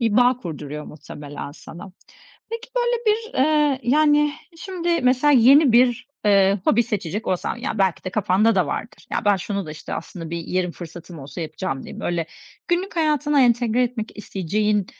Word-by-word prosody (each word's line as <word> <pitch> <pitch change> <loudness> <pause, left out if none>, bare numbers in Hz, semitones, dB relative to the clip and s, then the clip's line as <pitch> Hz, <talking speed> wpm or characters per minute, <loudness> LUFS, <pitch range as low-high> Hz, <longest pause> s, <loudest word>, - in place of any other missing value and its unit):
bir 225 -3 +1
bağ 245 0 +5
kurduruyor 150 - -7
muhtemelen 145 -1 -9
sana. 175 +5 -11 0.6
Peki, 460 0 -6
böyle, 485 0 +2
bir, 445 +1 0
eee, 295 -1 +3
yani, 295 +3 +4
eee, 295 -1 +1 0.2
şimdi 345 -1 -2
mesela 255 +3 +3
yeni 265 +2 +6
bir, 245 +1 +3 0.2
eee, 200 -1 +4
hobi 235 - +4
seçecek 210 -1 -4
olsan 185 +4 -1
ya 240 -2 -4
belki 190 -4 +1
de 185 - -3
kafanda 215 +3 +2
da 185 -4 +2
vardır. 225 - -6
Ya, - - -1
"Ben 205 -1 +4
şunu 200 0 -4
da, 155 - -7
işte, 155 - -7
aslında 165 -3 -7
bir 170 - -3
yerim 180 +1 -2
fırsatım 170 0 -10
olsa 140 +3 -8
yapacağım." 155 -4 -4
diye. - - -9
Böyle, 170 -2 -2 0.4
günlük 360 +1 -1
hayatına 300 -2 +2
entegre 240 0 +2
etmek 235 -2 -3
isteyeceğin 210 +1 -1
220 Hz, 170 wpm, -22 LUFS, 180-280 Hz, 0.6 s, yeni